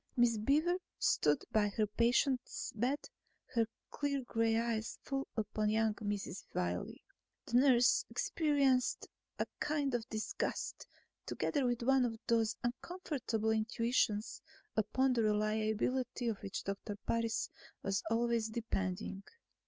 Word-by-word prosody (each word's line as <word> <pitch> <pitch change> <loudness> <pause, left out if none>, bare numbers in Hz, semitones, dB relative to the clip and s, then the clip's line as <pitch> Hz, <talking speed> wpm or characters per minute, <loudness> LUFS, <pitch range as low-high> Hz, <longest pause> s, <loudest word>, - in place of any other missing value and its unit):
Miss 235 -2 +4
Beaver 305 +10 +3 0.2
stood 150 -1 +2
by 215 -1 +3
her 215 +1 +1
patient's 245 +4 +1
bed, 250 +6 -1 0.5
her 230 -2 +3 0.2
clear 280 -2 -1
gray 225 -2 +1
eyes 230 -1 -1
full 275 -1 -2
upon 215 0 0
young 220 0 +2
Mrs. 205 -3 -4
Wiley. 90 0 -2 0.4
The 240 - +2
nurse 250 -3 +5
experienced 280 -5 +2 0.3
a - - 0
kind 290 -3 0
of 240 0 -2
disgust, 215 -1 -3 0.4
together 280 -5 0
with 240 -1 0
one 265 +1 +4
of 230 -2 -1
those 225 -2 +2
uncomfortable 245 - -2
intuitions 220 -1 +1 0.3
upon 255 +5 +2
the 235 - +2
reliability 220 +4 +1
of 220 - -2
which 195 - -4
Doctor 200 +1 -4
Parris 230 -1 0 0.3
was 195 0 0
always 230 -1 +1
depending. 195 -4 -2
230 Hz, 120 wpm, -35 LUFS, 215-255 Hz, 0.5 s, nurse